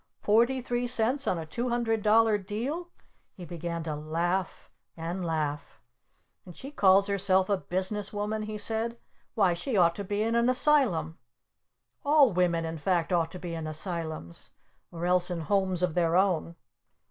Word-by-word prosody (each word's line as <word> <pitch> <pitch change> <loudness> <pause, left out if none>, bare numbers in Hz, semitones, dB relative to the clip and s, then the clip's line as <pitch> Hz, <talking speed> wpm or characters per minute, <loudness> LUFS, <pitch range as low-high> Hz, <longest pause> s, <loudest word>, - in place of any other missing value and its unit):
"Forty 235 +5 +3
three 245 0 -2
cents 250 +3 +1
on 180 - +1
a 165 - -5
two 240 +10 -3
hundred 230 -2 0
dollar 215 0 +4
deal?" 240 - -4 0.5
He 180 - -9
began 170 0 -5
to 155 -2 -4
laugh! 170 +4 -3 0.3
And 170 +3 -4
laugh! 150 -3 -3 0.6
"And 175 - -13
she 275 - -9
calls 195 -6 +4
herself 195 -1 +1
a 200 - +2
Business 190 +3 -2
Woman?" 210 +1 -3
he 215 0 -5
said. 225 +2 0 0.4
"Why, 195 -5 +3
she 205 +7 -3
ought 170 -2 +4
to 200 - -4
be 205 +2 -2
in 225 +1 -1
an 235 +1 +2
Asylum! 250 - +2 0.8
All 285 -6 +4
women, 170 -2 +1
in 160 0 -5
fact, 175 +1 0
ought 165 -2 +1
to - - -6
be 175 -1 -6
in 160 -1 -5
Asylums 160 - -5 0.4
or 170 0 -5
else 180 0 +2
in 175 -2 -3
homes 185 +1 0
of 180 -3 +1
their 170 -1 +1
own!" 180 -3 +1
190 Hz, 170 wpm, -28 LUFS, 170-220 Hz, 0.8 s, dollar